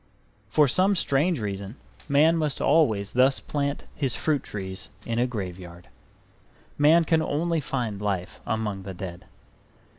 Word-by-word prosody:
For 150 -2 +4
some 190 +9 +4
strange 155 0 +1
reason 100 0 -5 0.3
man 150 +4 +5
must 155 -4 -1
always 110 -10 +2
thus 130 +2 +3
plant 140 -1 -3
his 135 -4 -1
fruit 150 -4 0
trees 95 -2 -6 0.2
in 115 0 -1
a 125 - +2
graveyard. 90 -5 -7 0.9
Man 155 +4 +5
can 160 -1 +2
only 165 +2 0
find 120 -7 -3
life 95 -4 -3
among 105 -3 -2
the 95 -1 -7
dead. 90 -1 -7
125 Hz, 140 wpm, -26 LUFS, 100-150 Hz, 0.9 s, man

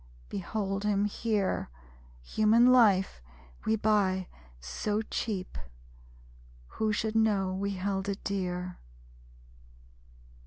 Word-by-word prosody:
Behold 195 +1 -3
him 205 -1 +2
here. 210 - -1 0.5
(Human 215 - +4
life 200 - +4 0.5
we 220 - +4
buy 200 -4 +1 0.3
so 205 - -2
cheap, 205 - -4 1.1
Who 220 -1 -1
should 220 +1 -1
know 205 -4 +2
we 200 +1 -2
held 195 +1 -2
it 200 - -4
dear?) 180 -2 -3
200 Hz, 90 wpm, -30 LUFS, 190-215 Hz, 1.1 s, Human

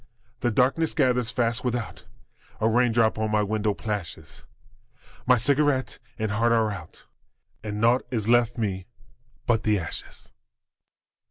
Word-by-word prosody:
The 120 - +1
darkness 130 +8 +1
gathers 125 -5 +2
fast 120 -1 -1
without, 120 -2 -4 0.5
A 110 - +2
raindrop 115 -1 +2
on 110 0 0
my 105 0 +2
window 105 0 -1
plashes; 105 -6 -6 0.8
My 125 0 +6
cigarette 140 +2 +1 0.2
and 110 -2 -2
heart 115 +3 +2
are 110 -2 +2
out, 95 -6 -10 0.6
And 105 -1 -4
naught 120 +3 +2
is 110 -4 -2
left 120 0 +3
me 95 -5 -3 0.6
but 115 -2 +2
the 105 -1 +2
ashes. 85 -4 -8
115 Hz, 135 wpm, -25 LUFS, 105-125 Hz, 0.8 s, My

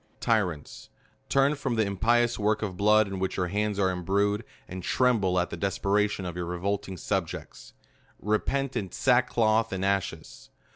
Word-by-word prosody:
TYRANTS! 95 -10 -1 0.4
Turn 140 +1 +3
from 135 -4 -2
the 110 -1 +2
impious 120 +4 +1
t\^ork 105 +1 0
of 95 -4 -3
blood 105 +2 +4
in 95 -1 -5
which 95 0 -2
your 90 -1 -1
hands 105 +1 -1
are 95 -2 +2
imbrued, 100 +4 0 0.2
and 95 +1 -7
tremble 105 -4 +2
at 90 - -2
the - - -3
desperation 100 +2 0
of 90 -1 -5
your 90 -1 -3
revoking 95 +2 -3
subjects! 90 -1 -4 0.5
repent 130 +6 -1
in 100 -7 -3
sack 125 -1 +2
cloth 110 -1 +2
and 95 0 -2
ashes. 95 -5 -3
100 Hz, 160 wpm, -27 LUFS, 95-110 Hz, 0.5 s, blood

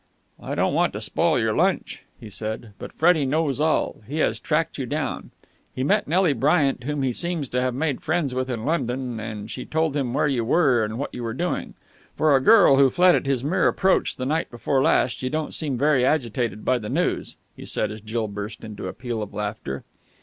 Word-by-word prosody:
"I - - -4
don't - - +1
want - - +2
to - - -4
spoil - - +1
your - - +1
lunch," - - 0 0.2
he 115 - -10
said, 110 +1 -5
"but - - -7
Freddie 160 -2 +3
knows 145 0 0
all. 155 -6 0
He 145 +5 -4
has 155 - +1
tracked 160 0 -1
you 130 - -3
down. 145 0 -3 0.5
He 130 - -2
met 140 - +2
Nelly 175 0 +3
Bryant, 140 -1 +1
whom 145 -1 -2
he 130 -2 0
seems 170 -1 -1
to 125 - 0
have 125 -1 -1
made 145 -1 -1
friends 160 -5 -1
with 130 0 -2
in 115 -2 -3
London, 125 -6 -2
and 110 -1 -6
she 125 - -5
told 160 -2 -1
him 135 -4 -1
where - - +2
you 135 -5 0
were 130 -3 +3
and 110 +1 -3
what 140 - -4
you 125 - -6
were 115 -1 -4
doing. 175 +5 -3 0.4
For 155 -2 +4
a 135 - +3
girl 200 -5 +6
who 135 -1 +6
fled 180 +6 +5
at 140 - 0
his 135 -3 0
mere 155 +6 +2
approach 190 0 +2
the 130 - -4
night 155 +4 -1
before 130 +3 0
last, 125 -2 +2
you 130 - -1
don't 155 +1 -3
seem 145 -6 -1
very 140 -1 +3
agitated 120 -5 0
by 130 -1 +2
the 105 -2 -6
news," - - -1 0.2
he - - -10
said, - - -1
as 110 0 -8
Jill 110 +1 -2
burst 105 +1 -7
into 110 -2 -7
a - - -5
peal 120 -3 -4
of 105 -1 -7
laughter. 105 -10 -4
130 Hz, 225 wpm, -24 LUFS, 115-155 Hz, 0.5 s, girl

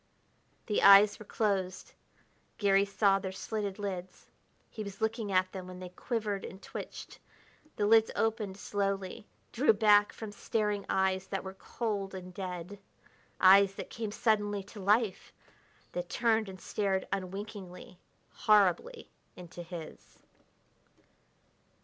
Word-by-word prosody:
The 210 - 0
eyes 200 +1 +8
were 215 - -10
closed; 190 -4 -1 0.6
Garry 200 -1 +3
saw 200 0 +2
their 190 -1 -5
slitted 200 0 -4
lids. 185 -3 -6 0.4
He 215 - -6
was 200 -1 -8
looking 220 -1 -1
at 185 0 +2
them 185 -2 -7
when 185 0 -9
they 185 -1 -7
quivered 210 +1 -3
and 190 - -8
twitched. - - -8 0.6
The 205 - 0
lids 225 +1 +5
opened 220 -3 -1
slowly, 200 +1 -3 0.2
drew 250 0 +4
back 205 -1 +5
from 220 -2 -8
staring 210 -1 -2
eyes 190 0 +1
that 195 - -3
were 190 0 -7
cold 200 -1 -4
and 185 -1 -8
dead 180 +1 -6 0.6
eyes 195 +1 +7
that - - -7
came 220 -2 -4
suddenly 205 -2 0
to 205 +2 -12
life, 205 +1 +1 0.6
that 175 0 -4
turned 225 -3 +1
and 185 -1 -10
stared 195 -2 -1
unwinkingly, 195 -1 -7 0.3
horribly, 215 - +2 0.3
into 175 0 -10
his. 170 -2 -10
200 Hz, 130 wpm, -31 LUFS, 190-210 Hz, 0.6 s, eyes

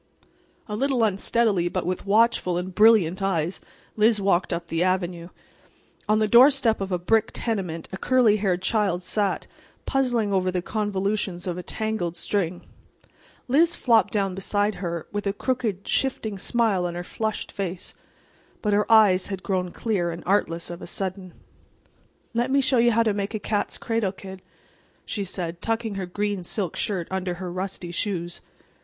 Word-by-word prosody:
A 210 - -4
little 265 0 +1
unsteadily, 200 -2 +1
but - - -2
with 185 +2 -3
watchful 210 -4 +3
and 180 +1 -4
brilliant 210 -4 +5
eyes, 180 -3 -1 0.3
Liz 215 0 +4
walked 190 -2 +1
up 170 0 -2
the 165 0 -2
avenue. 180 -2 -1 0.8
On 215 - +4
the 215 0 +2
doorstep 240 -1 +5
of 195 0 -3
a 180 - +1
brick 220 +5 +2
tenement 185 -8 -3
a 190 - -5
curly 240 -1 +3
haired 185 -3 0
child 190 -3 +1
sat, 200 +1 0 0.4
puzzling 245 -6 +1
over 185 -1 +2
the 180 -1 -2
convolutions 200 -3 -2
of 180 -2 -2
a 180 - -5
tangled 200 -4 -3
string. 180 -3 -2 0.8
Liz 325 +7 +3
flopped 225 -5 +3
down 195 -3 0
beside 205 +2 0
her, 170 -3 -3
with 205 0 -3
a 200 - 0
crooked, 220 -4 -2
shifting 220 -6 -1
smile 210 -5 +1
on 175 - -5
her 175 - -4
flushed 220 +3 -3
face. 185 -2 -5 0.7
But 210 -2 +1
her 210 +2 +1
eyes 205 -5 +6
had 195 -2 -5
grown 185 -2 -1
clear 185 -3 -1
and 170 0 -6
artless 170 -3 0
of 175 - -8
a - - -7
sudden. 185 0 -5 1.0
"Let 240 +2 0
me 275 +1 +3
show 265 -2 +3
you 240 +1 +5
how 230 +1 +3
to 220 -2 +1
make 200 +2 -3
a - - -2
cat's 205 0 -2
cradle, 225 -4 -1
kid," 190 -1 -10 0.6
she 205 - -3
said, 175 -2 -5
tucking 225 -1 -1
her 195 -2 -4
green 205 0 -2
silk 180 -1 -2
skirt 185 -5 -2
under 185 -1 -2
her 180 0 -6
rusty 185 -1 -4
shoes. 175 -2 -3
195 Hz, 170 wpm, -25 LUFS, 180-220 Hz, 1.0 s, eyes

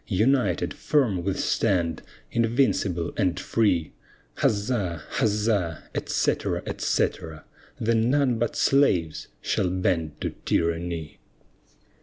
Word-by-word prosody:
United, 110 -1 +1
firm 115 - +1
we 100 - 0
stand, 90 -8 0 0.3
invincible 115 -8 +1
and 95 -5 +1
free, 95 -9 +1 0.4
Huzza! 100 - 0 0.2
huzza! 105 -6 0
etc., - - -1
etc. 80 -2 -2 0.4
Then 115 +1 +2
none 130 -4 +2
but 120 -1 -1
slaves 90 - +2 0.2
shall 90 - 0
bend 85 -4 -1
to - - -2
tyranny. 85 -2 -1
95 Hz, 95 wpm, -25 LUFS, 85-115 Hz, 0.4 s, Then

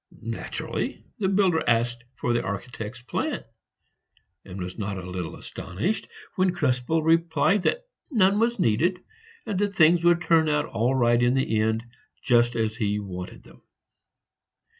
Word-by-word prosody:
Naturally - - -4
the 195 - +1
builder 190 -4 +2
asked 120 +1 +1
for 120 - -1
the 120 - +1
architect's 110 +3 -6
plan, - - -2 1.0
and 95 0 -9
was 90 +3 -6
not 100 -1 -3
a 90 -1 -7
little 90 -2 -5
astonished 95 - -4 0.3
when 185 -2 +2
Krespel 145 +1 +1
replied 165 +3 +3
that - - 0 0.3
none 205 - +3
was 235 +1 +2
needed, 170 - +2 0.5
and 195 - -2
that 205 -1 0
things 170 0 +5
would 175 0 +4
turn 160 -2 +4
out 150 0 +1
all 120 +4 0
right 120 -2 +3
in 120 +1 +3
the 120 -5 +1
end, 110 +1 0 0.4
just 120 -1 +3
as 110 -1 -1
he 105 -3 0
wanted 90 -3 -7
them. - - -18
125 Hz, 150 wpm, -25 LUFS, 110-175 Hz, 1.0 s, things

